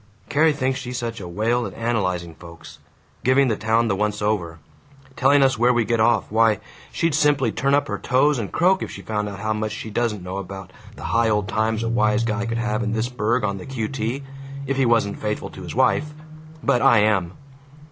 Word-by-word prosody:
"Carrie 155 Hz, +1 st, +4 dB
thinks 135 Hz, -2 st, -1 dB
she's 125 Hz, -1 st, -5 dB
such 115 Hz, -3 st, -4 dB
a 90 Hz, -, -6 dB
whale 115 Hz, +7 st, 0 dB
at -, -, -10 dB
analyzing 90 Hz, -8 st, -1 dB
folks. 85 Hz, 0 st, -13 dB, 0.4 s
Giving 130 Hz, +1 st, +4 dB
the 110 Hz, -, +1 dB
town 110 Hz, +2 st, +1 dB
the 100 Hz, -, +1 dB
once 105 Hz, +1 st, -1 dB
over. 100 Hz, -6 st, -1 dB, 0.6 s
Telling 140 Hz, +1 st, +4 dB
us 135 Hz, -4 st, +2 dB
where 120 Hz, +1 st, +4 dB
we 120 Hz, -2 st, +1 dB
get 115 Hz, 0 st, 0 dB
off. 110 Hz, -3 st, +2 dB
Why, 110 Hz, -1 st, +4 dB, 0.3 s
she'd 165 Hz, -2 st, 0 dB
simply 145 Hz, -2 st, +2 dB
turn 140 Hz, +1 st, +1 dB
up 145 Hz, -, +1 dB
her -, -, -3 dB
toes 135 Hz, +2 st, +2 dB
and 105 Hz, -, -4 dB
croak 185 Hz, +2 st, +3 dB
if -, -, -4 dB
she -, -, -9 dB
found 105 Hz, -1 st, -2 dB
out 100 Hz, 0 st, -8 dB
how 110 Hz, +1 st, 0 dB
much 110 Hz, 0 st, -2 dB
she 110 Hz, 0 st, -6 dB
doesn't 105 Hz, -3 st, -1 dB
know 90 Hz, +1 st, -5 dB
about 95 Hz, -1 st, -8 dB, 0.2 s
the -, -, -10 dB
high 115 Hz, +5 st, +2 dB
old 105 Hz, -2 st, 0 dB
times 110 Hz, +2 st, 0 dB
a -, -, -1 dB
wise 110 Hz, -1 st, +2 dB
guy 115 Hz, 0 st, -1 dB
could 115 Hz, 0 st, -2 dB
have 110 Hz, -1 st, -1 dB
in 110 Hz, -1 st, -1 dB
this 115 Hz, +2 st, -1 dB
burg 120 Hz, -1 st, 0 dB
on 100 Hz, -1 st, -1 dB
the -, -, -9 dB
Q.T., 130 Hz, +1 st, -3 dB, 0.4 s
if 135 Hz, 0 st, -1 dB
he 135 Hz, -2 st, +2 dB
wasn't 115 Hz, -4 st, +1 dB
faithful 105 Hz, 0 st, -3 dB
to -, -, -10 dB
his -, -, -7 dB
wife. 150 Hz, +1 st, +1 dB, 0.5 s
But 120 Hz, -, +2 dB
I 120 Hz, -6 st, +5 dB
am. 95 Hz, -5 st, +1 dB
115 Hz, 220 wpm, -22 LUFS, 105-125 Hz, 0.6 s, I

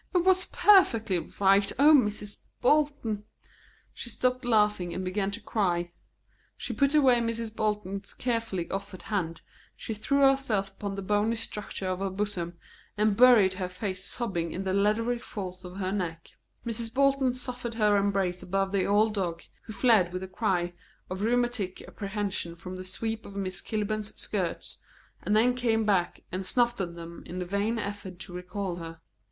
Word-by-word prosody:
It 355 Hz, -, +4 dB
was 370 Hz, 0 st, +4 dB
perfectly 225 Hz, -, +4 dB
right. 195 Hz, +3 st, +3 dB
O 295 Hz, +3 st, +7 dB
Mrs. 210 Hz, -6 st, +2 dB, 0.2 s
Bolton!" 280 Hz, -6 st, +1 dB, 0.7 s
She 235 Hz, -, -7 dB
stopped 255 Hz, +3 st, 0 dB
laughing 210 Hz, -6 st, +2 dB
and 185 Hz, -, -3 dB
began 195 Hz, +2 st, -1 dB
to 205 Hz, +3 st, -5 dB
cry; 175 Hz, -6 st, -1 dB, 0.7 s
she -, -, -4 dB
put 280 Hz, +1 st, +2 dB
away 265 Hz, -5 st, +6 dB
Mrs. 230 Hz, -1 st, -2 dB
Bolton's 205 Hz, -2 st, -2 dB
carefully 230 Hz, -8 st, -2 dB
offered 195 Hz, -2 st, -5 dB
hand, 170 Hz, -6 st, -2 dB, 0.3 s
she 225 Hz, -, -5 dB
threw 280 Hz, +7 st, 0 dB
herself 270 Hz, -8 st, +3 dB
upon 200 Hz, 0 st, -5 dB
the 195 Hz, -, -5 dB
bony 210 Hz, +3 st, +1 dB
structure 210 Hz, -3 st, -4 dB
of 185 Hz, 0 st, -1 dB
her 195 Hz, 0 st, -1 dB
bosom, 190 Hz, -3 st, -3 dB, 0.4 s
and 210 Hz, -1 st, +3 dB
buried 235 Hz, -5 st, +7 dB
her 185 Hz, -1 st, -3 dB
face 185 Hz, 0 st, -4 dB
sobbing 180 Hz, -10 st, -2 dB
in 185 Hz, -, -4 dB
the 190 Hz, -1 st, -1 dB
leathery 215 Hz, +4 st, +2 dB
folds 185 Hz, -5 st, -6 dB
of 180 Hz, +1 st, -9 dB
her 190 Hz, -1 st, -2 dB
neck. 170 Hz, -4 st, -4 dB, 0.3 s
Mrs. 230 Hz, -1 st, -3 dB
Bolton 275 Hz, -1 st, +2 dB
suffered 250 Hz, -2 st, -5 dB
her 210 Hz, -2 st, +3 dB
embrace 195 Hz, -3 st, +1 dB
above 195 Hz, +1 st, -1 dB
the 195 Hz, -2 st, +1 dB
old 210 Hz, +2 st, +3 dB
dog, 175 Hz, -5 st, -2 dB, 0.2 s
who 220 Hz, -, -7 dB
fled 200 Hz, -4 st, +4 dB
with 185 Hz, +1 st, -3 dB
a -, -, -5 dB
cry 185 Hz, -3 st, 0 dB, 0.4 s
of 185 Hz, +1 st, -3 dB
rheumatic 240 Hz, -4 st, 0 dB
apprehension 200 Hz, -4 st, -3 dB
from 185 Hz, +2 st, -8 dB
the 185 Hz, -, -6 dB
sweep 225 Hz, +4 st, -3 dB
of 200 Hz, -, -11 dB
Miss 190 Hz, -1 st, -3 dB
Kilburn's 215 Hz, -1 st, -1 dB
skirts, 185 Hz, -5 st, -3 dB, 0.4 s
and 210 Hz, -, +1 dB
then 245 Hz, +3 st, +4 dB
came 230 Hz, -3 st, +1 dB
back 190 Hz, -4 st, +1 dB
and 185 Hz, +2 st, -2 dB
snuffed 240 Hz, +3 st, +2 dB
at 170 Hz, -2 st, -4 dB
them 170 Hz, 0 st, -9 dB
in 180 Hz, -, -5 dB
a 180 Hz, -, -2 dB
vain 200 Hz, +5 st, 0 dB
effort 200 Hz, -4 st, -5 dB
to 185 Hz, -, -7 dB
recall 180 Hz, 0 st, -4 dB
her. 165 Hz, -1 st, -8 dB
205 Hz, 170 wpm, -28 LUFS, 185-230 Hz, 0.7 s, O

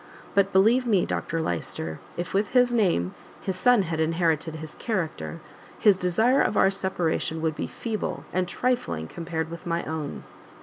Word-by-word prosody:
But 200 Hz, 0 st, +3 dB
believe 230 Hz, +7 st, +4 dB
me, 200 Hz, -6 st, +3 dB
Dr 165 Hz, -1 st, -2 dB
Lyster, 80 Hz, -, -3 dB, 0.2 s
if 175 Hz, +1 st, -4 dB
with 200 Hz, +4 st, 0 dB
his 245 Hz, -1 st, +5 dB
name, 175 Hz, -, +2 dB, 0.3 s
his 190 Hz, -, -3 dB
son 240 Hz, +2 st, +4 dB
had 165 Hz, -2 st, -3 dB
inherited 160 Hz, -1 st, +1 dB
his 155 Hz, -1 st, -7 dB
character, 160 Hz, -, -3 dB, 0.4 s
his 205 Hz, -2 st, +5 dB
desire 220 Hz, +9 st, +3 dB
of 210 Hz, -, +1 dB
our 195 Hz, -, +5 dB
separation 175 Hz, -4 st, -1 dB
would 160 Hz, -1 st, +1 dB
be -, -, -3 dB
feeble, 225 Hz, -3 st, -4 dB
and 185 Hz, 0 st, +1 dB
trifling, 175 Hz, -, -1 dB
compared 165 Hz, -, -4 dB
with 170 Hz, 0 st, -8 dB
my 170 Hz, 0 st, 0 dB
own!" 155 Hz, -2 st, -4 dB
175 Hz, 165 wpm, -26 LUFS, 160-205 Hz, 0.4 s, his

